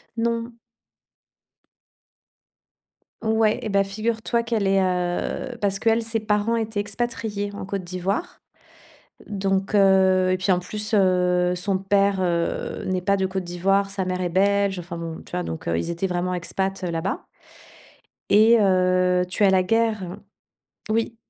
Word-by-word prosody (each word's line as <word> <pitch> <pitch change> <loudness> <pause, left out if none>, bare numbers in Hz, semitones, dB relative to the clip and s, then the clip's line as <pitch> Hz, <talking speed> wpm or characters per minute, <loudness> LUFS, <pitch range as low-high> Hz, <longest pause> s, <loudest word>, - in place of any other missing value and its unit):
Non. 230 +1 -1 2.7
Ouais 220 -1 +2
et 220 - -4
bah, 200 -1 +3
figure 220 +3 -3
toi 235 +1 +1
qu'elle 230 -3 -1
est, 195 0 +3
heu 180 +7 -1
parce 200 -1 +1
qu'elle, 225 +2 +2
ses 225 0 -2
parents 210 +1 0
étaient 220 -2 -2
expatriés 205 -1 -3
en 200 - -7
Côte 195 -1 -3
d'Ivoire, 190 - -3 0.9
donc 195 0 -1
heu, 190 -2 +4
et - - +2
puis, 185 +1 +1
en 180 - +2
plus, 210 +4 -5
heu, 180 -3 +3
son 190 +2 -1
père, 195 0 +2
heu, 170 -2 -1
n'est 185 -1 -1
pas 200 +2 +1
de 190 - -1
Côte 190 0 -2
d'Ivoire, 195 +3 +1
sa 195 -1 -3
mère 185 0 -2
est 180 - 0
belge. 200 +1 +2
Enfin 170 0 -7
bon, 165 -1 -6
tu - - -17
vois? 90 - -2
Donc 80 -1 -6
heu, 85 0 0
ils 85 - -3
étaient 170 +3 -2
vraiment 180 0 -1
expats 190 +2 -3
là-bas. 170 +1 -3 1.1
Et 220 +3 +6
heu, 185 -2 +3
tu 195 +4 -1
as 200 - +6
la 190 -1 +3
guerre. 215 -3 0 0.7
Oui. 230 +1 0
195 Hz, 155 wpm, -23 LUFS, 180-215 Hz, 2.7 s, Et